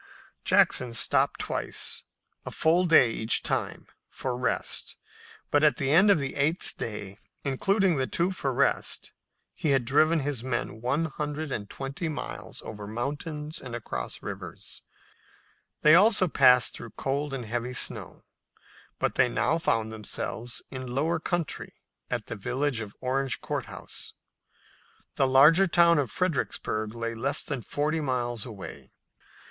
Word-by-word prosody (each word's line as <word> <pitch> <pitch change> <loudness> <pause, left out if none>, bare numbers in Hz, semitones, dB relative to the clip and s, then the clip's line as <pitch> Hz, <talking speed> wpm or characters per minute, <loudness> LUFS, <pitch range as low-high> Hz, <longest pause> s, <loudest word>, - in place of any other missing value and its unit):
Jackson 125 -2 +3
stopped - - +2
twice, - - -2 0.4
a - - -6
full 170 +3 +2
day 130 -8 +6
each 110 +1 +3
time, - - -1 0.2
for 130 -2 -4
rest, 125 -1 -1 0.5
but 145 +1 +3
at 150 - +4
the 135 0 0
end 190 +7 +6
of 200 - +6
the 140 -2 -3
eighth 150 +5 0
day, 105 -3 -6 0.2
including 185 +6 +2
the 130 -1 0
two 175 +3 0
for 140 -7 -2
rest, 125 - 0 0.4
he 155 - -2
had 135 -3 +3
driven 155 +5 +3
his 135 -4 -3
men 120 -3 -3
one 140 +7 0
hundred 150 0 -4
and 100 -5 -4
twenty 140 +5 -4
miles 155 - -6
over 105 -2 -7
mountains 150 - -4
and 125 -2 -6
across 65 - -5
rivers. - - -8 1.0
They 150 - +7
also 195 +1 +6
passed 125 -5 +5
through 115 - -9
cold 140 +2 -2
and 130 -3 -4
heavy 120 +3 -3
snow, - - -1 0.7
but - - 0
they 125 - +3
now 120 +8 +1
found 110 -7 0
themselves 110 +2 -3
in 130 -1 -6
lower 160 +4 +1
country 175 -1 -3 0.3
at - - -2
the - - -5
village 125 +5 -1
of 105 -2 -7
Orange 130 0 -1
Court - - -4
House. - - -6 1.0
The 135 - +2
larger 150 +9 +6
town 170 -2 +5
of 135 -5 -1
Fredericksburg 110 - -2
lay 115 0 -3
less 140 +6 -1
than 135 -5 -4
forty 150 +6 -1
miles 120 -5 -2
away. 105 -5 -9
135 Hz, 145 wpm, -27 LUFS, 120-155 Hz, 1.0 s, They